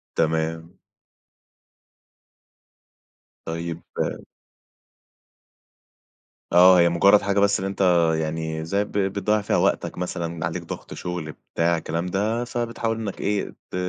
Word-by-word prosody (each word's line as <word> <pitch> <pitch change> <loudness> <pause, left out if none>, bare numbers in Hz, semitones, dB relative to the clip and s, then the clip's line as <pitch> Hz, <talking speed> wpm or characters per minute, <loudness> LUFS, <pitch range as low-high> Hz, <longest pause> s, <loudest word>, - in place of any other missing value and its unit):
تمام. 80 +2 -1 2.7
طيب 85 0 -4 2.7
آه 90 +1 +8
هي 85 0 +5
مجرد 100 +4 +5
حاجة 100 0 +1
بس 100 0 +3
اللي 95 - -2
أنت 100 - -5 0.4
يعني 80 0 -3
زي 100 +5 0
ب 105 - -11
بتضيّع 100 +2 0
فيها 100 - 0
وقتك - - 0
مثلًا 85 -2 -3
عليك 80 - -3
ضغط - - -8
شغل 90 -3 -5 0.2
بتاع 85 0 +2
الكلام 80 +2 -3
ده، 105 +6 -1
فبتحاول 115 -2 -2
إنك 105 -4 -5
إيه، 100 0 -1 0.2
ت - - -6
90 Hz, 110 wpm, -24 LUFS, 80-100 Hz, 2.7 s, آه